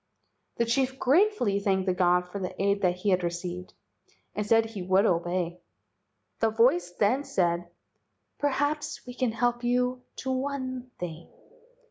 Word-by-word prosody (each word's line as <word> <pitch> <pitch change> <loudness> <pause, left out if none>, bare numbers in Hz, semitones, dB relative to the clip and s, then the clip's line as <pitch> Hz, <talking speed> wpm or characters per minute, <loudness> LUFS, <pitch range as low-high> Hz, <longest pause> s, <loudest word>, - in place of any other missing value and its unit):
The 235 - +2
chief 260 +2 0
gratefully 285 - +3
thanked 190 -2 +1
the 185 - +2
god 180 0 +2
for 200 +3 -6
the 185 -1 -5
aid 200 +1 +1
that 180 -2 +2
he 195 +2 0
had 185 -1 +2
received, 175 +1 -4 0.6
and 210 - -2
said 225 +2 +4
he 220 -3 -7
would 190 +3 +3
obey. 175 -1 0 0.8
The 225 - +3
voice 220 -6 +3
then 215 +9 +1
said: 175 -6 0 0.7
"Perhaps 290 +2 -1
we 250 - -8
can 250 -2 0
help 240 +1 0
you 250 +1 +1 0.2
to 265 - -1
one 260 -1 -3
thing. 170 -2 -7
205 Hz, 150 wpm, -28 LUFS, 180-255 Hz, 0.8 s, said